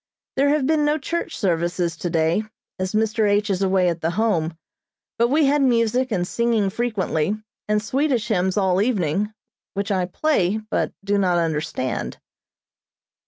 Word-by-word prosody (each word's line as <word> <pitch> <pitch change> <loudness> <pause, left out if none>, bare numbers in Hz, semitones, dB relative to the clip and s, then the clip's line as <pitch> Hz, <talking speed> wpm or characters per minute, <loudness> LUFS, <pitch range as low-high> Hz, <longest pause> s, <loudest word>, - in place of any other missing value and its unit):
There 275 +1 +3
have 295 -2 +2
been 310 +1 +2
no 295 +1 +2
church 335 +4 -3
services 175 -2 0
today, 165 -1 +1 0.4
as 185 +1 -2
Mr. 220 0 +2
H. 205 +1 +2
is 190 0 -1
away 190 -1 +3
at 170 -1 -1
the 160 - 0
Home, 170 -5 0 0.6
but 235 - +4
we 295 +4 +3
had 285 +1 +3
music 245 0 +2
and 180 -4 0
singing 230 -4 +1
frequently, 205 -6 -1 0.3
and 210 0 +2
Swedish 255 -1 0
hymns 190 -2 +1
all 190 -1 +2
evening, 205 -3 0 0.4
which 200 +1 -2
I 185 -2 +1
play, 210 - +1
but 215 0 -2
do 200 0 +1
not 180 -3 +2
understand. 150 -5 -2
205 Hz, 155 wpm, -22 LUFS, 180-235 Hz, 0.6 s, but